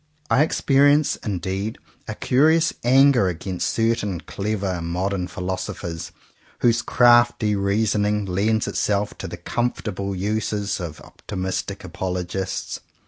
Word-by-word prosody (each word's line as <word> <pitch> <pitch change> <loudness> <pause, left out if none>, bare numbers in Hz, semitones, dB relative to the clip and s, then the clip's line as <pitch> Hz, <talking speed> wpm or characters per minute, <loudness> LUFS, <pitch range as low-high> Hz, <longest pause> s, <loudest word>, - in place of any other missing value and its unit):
I 135 - +5
experience 145 -1 +3
indeed 95 +1 -3 0.3
a - - -4
curious 160 +5 +3
anger 130 -3 +5
against 90 +1 -2
certain 115 -5 0
clever 100 -4 -3
modern 90 +2 -2
philosophers 90 -1 -5 0.5
whose 120 -1 +3
crafty 120 -3 +4
reasoning 105 +1 +1
lends 100 +4 0
itself 105 0 0
to - - -5
the - - -7
comfortable 100 -5 -2
uses 105 +1 -1
of 85 -4 -6
optimistic 95 0 -5
apologists. 95 +1 -4
100 Hz, 105 wpm, -23 LUFS, 95-115 Hz, 0.5 s, I